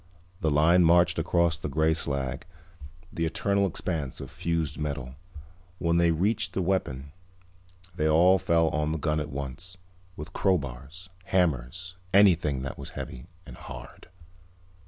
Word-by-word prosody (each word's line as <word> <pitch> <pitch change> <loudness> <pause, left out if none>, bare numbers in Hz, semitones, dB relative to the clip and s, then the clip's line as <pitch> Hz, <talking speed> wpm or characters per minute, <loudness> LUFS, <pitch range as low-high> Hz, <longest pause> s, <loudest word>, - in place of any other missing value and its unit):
The 80 -5 +1
line 80 +5 +4
marched 85 0 +4
across 85 -1 +1
the 75 - -4
gray 80 +3 +2
slag, 70 -4 -2 0.7
the 85 - -2
eternal 100 +4 +1
expanse 80 -6 -4
of - - -8
fused 80 -2 -2
metal. 70 -4 -4 0.6
When 85 -1 +1
they 85 0 +4
reached 95 +7 0
the 95 - -1
weapon 70 -7 -2 0.8
they 80 -2 +1
all 90 +5 +5
fell 85 -1 +2
on 75 0 -1
the - - -1
gun 75 0 0
at 75 0 -4
once, 70 +6 -6 0.4
with 75 +2 -9
crowbars, 80 0 -2 0.2
hammers, 90 0 -1 0.2
anything 85 -9 +4
that 65 - -6
was - - -7
heavy 65 - -7 0.2
and - - -10
hard. - - -11
80 Hz, 140 wpm, -27 LUFS, 70-90 Hz, 0.8 s, all